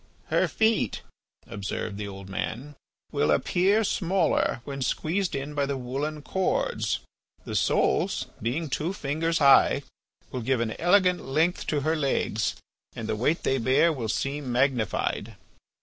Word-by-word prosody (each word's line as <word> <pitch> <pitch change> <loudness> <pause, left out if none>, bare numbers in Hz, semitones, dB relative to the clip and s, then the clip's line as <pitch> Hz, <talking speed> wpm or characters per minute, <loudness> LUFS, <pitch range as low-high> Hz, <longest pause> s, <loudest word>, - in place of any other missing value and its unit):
"Her - - +3
feet," 220 0 +1 0.4
observed 100 +1 -4
the 105 - -4
old 95 -1 -9
man, 125 +9 -4 0.4
"will 75 - +1
appear 190 - +3
smaller 185 - +1
when 140 0 -6
squeezed 170 +8 -1
in 140 +2 -4
by 140 -1 0
the 140 -1 -2
woollen 140 +4 -4
cords. 190 +3 0 0.5
The - - -5
soles, - - +1 0.2
being 135 +9 -1
two 155 +6 -2
fingers 165 +1 -1
high, 140 -3 +5 0.5
will 125 - -3
give 130 +2 +1
an 115 -1 -1
elegant 180 0 +3
length 160 +6 0
to 150 -2 0
her 155 +3 +1
legs 135 -8 0 0.4
and 110 - -5
the - - -1
weight 140 +9 0
they 135 - +1
bear 130 +8 +3
will 120 -6 -4
seem 135 +2 -2
magnified." 125 -3 0
140 Hz, 145 wpm, -27 LUFS, 120-165 Hz, 0.5 s, high